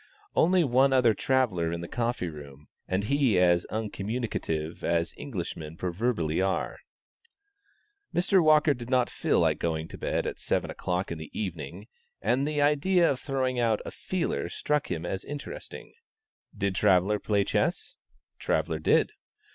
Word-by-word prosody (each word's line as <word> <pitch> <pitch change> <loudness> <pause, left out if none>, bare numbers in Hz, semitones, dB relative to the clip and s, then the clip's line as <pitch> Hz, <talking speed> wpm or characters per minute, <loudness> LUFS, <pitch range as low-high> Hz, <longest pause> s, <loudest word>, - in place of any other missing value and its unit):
Only 180 +1 +4
one 135 0 +4
other 125 -4 +5
traveller 105 -10 +1
in 85 0 -3
the 85 - -6
coffee 120 -4 -1
room, 75 -2 -10 0.2
and 95 +2 0
he 135 -2 +2
as 90 -1 +4
uncommunicative 105 -7 -3
as 85 0 0
Englishmen 85 - -6
proverbially 90 -2 -1
are. 95 0 -1 1.3
Mr. 180 +1 +3
Walker 155 -1 +5
did 120 -2 -8
not 125 -2 +2
feel - - +1
like - - +2
going 80 -1 -1
to - - -10
bed - - -1
at - - -4
seven - - -1
o'clock 90 +1 -2
in 85 - -4
the 80 - -8
evening, 85 -1 -5 0.3
and 125 +6 +1
the 150 -1 +1
idea 170 +5 +3
of 130 - -3
throwing 130 -2 -1
out 115 -3 +2
"a - - -5
feeler" 185 -2 -2
struck 150 -1 -1
him 85 -1 -3
as 95 +2 -3
interesting. 145 -1 -8 0.6
"Did 100 -1 0
Traveller 95 +3 +3
play 100 -1 +1
chess?" - - -1 0.4
Traveller 80 -1 0
did. 80 - +3
105 Hz, 150 wpm, -28 LUFS, 85-135 Hz, 1.3 s, other